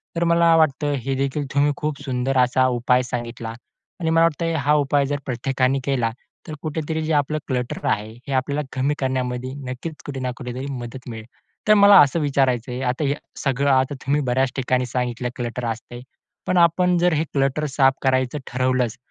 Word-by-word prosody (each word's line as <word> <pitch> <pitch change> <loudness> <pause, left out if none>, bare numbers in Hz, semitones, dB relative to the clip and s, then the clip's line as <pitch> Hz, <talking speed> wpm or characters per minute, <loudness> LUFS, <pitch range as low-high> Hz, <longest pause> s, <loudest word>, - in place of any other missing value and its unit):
तर 170 - 0
मला 170 0 +4
वाटतं, 145 -2 +2
हे 135 0 -2
देखील 140 +2 -1
तुम्ही 145 +1 +3
खूप 150 -2 -3
सुंदर 130 -1 -1
असा 130 +1 +3
उपाय 125 +1 +2
सांगितला. 120 -2 -5 0.5
आणि 165 -2 -1
मला 165 0 +4
वाटतं, 165 +1 0
हा 150 -1 +2
उपाय 145 -1 +2
जर 145 +1 -2
प्रत्येकाने 130 +1 0
केला, 130 -4 0 0.4
तर 155 - -6
कुठेतरी 160 0 -3
जे 155 -2 +3 0.3
क्लटर 125 -2 -3
आहे, 105 +1 -1 0.2
हे 140 - -3
आपल्याला 140 +3 0
कमी 135 +3 0
करण्यामध्ये 130 -1 -2 0.2
नक्कीच 130 +6 -5
कुठे 140 -2 -5
ना 130 -1 -2
कुठेतरी 125 +1 -6
मदत 125 0 -7
मिळेल. 110 -1 -7 0.4
तर 215 - +7
मला 200 -1 +8
असं 145 +4 +3
विचारायचं 135 -5 +1
आहे, 125 +2 -4
आता 130 +3 -1
हे 140 0 +1 0.3
सगळं 140 0 +1
आता 130 +2 +2
तुम्ही 145 +2 +2
बऱ्याच 130 0 +1
ठिकाणी 130 -1 0
सांगितलं 125 0 -2
क्लटर 120 -1 -4
असते. 115 +2 -5 0.5
पण 185 - +1
आपण 175 +1 +4
जर 175 0 +3
हे 155 0 +1
क्लटर 140 +2 +1
साफ 135 -1 +3
करायचं 130 +1 +1
ठरवलंच, 125 -2 0
135 Hz, 180 wpm, -22 LUFS, 125-150 Hz, 0.5 s, मला